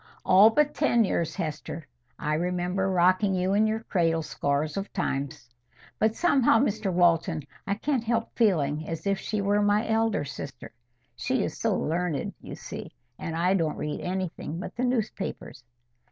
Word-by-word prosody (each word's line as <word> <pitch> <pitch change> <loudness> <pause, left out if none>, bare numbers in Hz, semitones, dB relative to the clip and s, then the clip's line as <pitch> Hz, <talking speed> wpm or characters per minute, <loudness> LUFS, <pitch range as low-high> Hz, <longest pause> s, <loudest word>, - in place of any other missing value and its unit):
"All 195 +4 +7
but 295 +6 +2
ten 240 -6 +3
years, 170 -5 -1
Hester. 160 -2 -4 0.3
I 150 - -1
remember 180 +3 0
rocking 185 +2 +3
you 185 +1 +1
in 215 +2 +4
your 220 +1 -1
cradle 165 -6 +1
scores 145 0 -1
of 195 +1 -4
times. 135 -8 -3 0.5
But 220 0 +2
somehow, 275 -9 +4
Mr 215 -5 0
Walton, 170 -2 +2 0.2
I 200 - +1
can't 260 +2 -1
help 230 0 -1
feeling 155 - +1
as 165 +2 -5
if 195 -1 +1
she 215 +1 -2
were 205 +1 +2
my 205 +2 +2
elder 220 -7 +1
sister. 140 -2 -8 0.4
She - - 0
is - - -3
so - - 0
learned, 165 -2 -1
you - - -8
see; - - -8 0.2
and 165 - -4
I 180 +3 +2
don't 165 -5 0
read 150 - -3
anything 180 -3 -4
but - - -7
the 250 - 0
newspapers." 215 - -3
185 Hz, 165 wpm, -27 LUFS, 165-215 Hz, 0.5 s, All